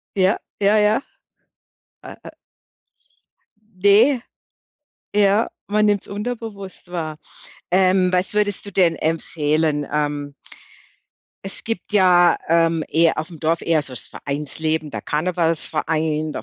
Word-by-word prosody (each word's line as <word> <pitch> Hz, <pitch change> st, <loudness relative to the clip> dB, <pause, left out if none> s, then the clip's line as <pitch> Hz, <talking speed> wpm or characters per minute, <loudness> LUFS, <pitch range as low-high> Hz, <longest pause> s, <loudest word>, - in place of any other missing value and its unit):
Ja, 190 Hz, 0 st, +3 dB, 0.2 s
ja, 205 Hz, +2 st, +4 dB
ja. 210 Hz, +5 st, +3 dB, 1.0 s
A -, -, -10 dB
a -, -, -9 dB, 1.5 s
Ne. 230 Hz, +6 st, +5 dB, 0.9 s
Ja, 205 Hz, +2 st, +3 dB, 0.2 s
man 210 Hz, +1 st, +2 dB
nimmt's 205 Hz, -2 st, 0 dB
unterbewusst 205 Hz, -4 st, -6 dB
wahr. 155 Hz, -3 st, -4 dB, 0.5 s
Ähm, 185 Hz, 0 st, +3 dB
was 180 Hz, +1 st, 0 dB
würdest 205 Hz, -2 st, 0 dB
du 200 Hz, -, -8 dB
denn 175 Hz, -3 st, +3 dB
empfehlen? 155 Hz, -2 st, 0 dB
Ähm, 145 Hz, -1 st, -2 dB, 1.1 s
es 195 Hz, -, -7 dB
gibt 225 Hz, -3 st, -5 dB
ja, 180 Hz, -3 st, +5 dB
ähm, 165 Hz, -1 st, +2 dB
eher 165 Hz, +1 st, +2 dB
aufm 160 Hz, +1 st, -6 dB
Dorf 165 Hz, +2 st, 0 dB
eher 160 Hz, -2 st, +2 dB
so 135 Hz, -, -7 dB
das 125 Hz, -, -6 dB
Vereinsleben, 150 Hz, +2 st, -3 dB
der -, -, -6 dB
Karnevalsverein, 155 Hz, -1 st, -1 dB
der -, -, -5 dB
170 Hz, 115 wpm, -21 LUFS, 155-200 Hz, 1.5 s, Ne